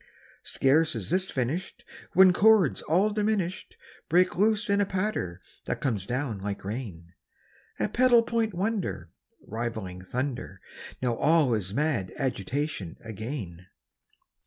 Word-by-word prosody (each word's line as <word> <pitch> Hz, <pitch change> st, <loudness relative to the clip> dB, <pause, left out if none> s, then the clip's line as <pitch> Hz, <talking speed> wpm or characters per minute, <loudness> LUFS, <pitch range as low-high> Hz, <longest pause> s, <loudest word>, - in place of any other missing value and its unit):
Scarce 150 Hz, +4 st, +2 dB
is -, -, -4 dB
this 185 Hz, +1 st, +2 dB
finished 140 Hz, +9 st, -3 dB, 0.3 s
When 185 Hz, 0 st, +7 dB
chords 205 Hz, -, +4 dB
all 190 Hz, +7 st, +2 dB
diminished 205 Hz, -4 st, -2 dB, 0.3 s
Break 180 Hz, +3 st, +3 dB
loose 215 Hz, +3 st, +2 dB
in 200 Hz, 0 st, +2 dB
a -, -, +3 dB
patter 185 Hz, -, -2 dB, 0.3 s
that -, -, -2 dB
comes 110 Hz, -9 st, -2 dB
down 125 Hz, -4 st, -2 dB
like 100 Hz, 0 st, -5 dB
rain, 95 Hz, -6 st, -6 dB, 0.7 s
A 105 Hz, -, +1 dB
pedal 245 Hz, -1 st, +4 dB
point 225 Hz, -4 st, -1 dB
wonder 190 Hz, -, -2 dB, 0.4 s
Rivaling 110 Hz, -5 st, -5 dB
thunder. 120 Hz, -3 st, -4 dB, 0.4 s
Now 125 Hz, -2 st, +2 dB
all 150 Hz, -5 st, +3 dB
is 100 Hz, -4 st, -1 dB
mad 125 Hz, -6 st, 0 dB
agitation 135 Hz, -, -3 dB
again. 110 Hz, -, -6 dB
145 Hz, 125 wpm, -27 LUFS, -, 0.7 s, When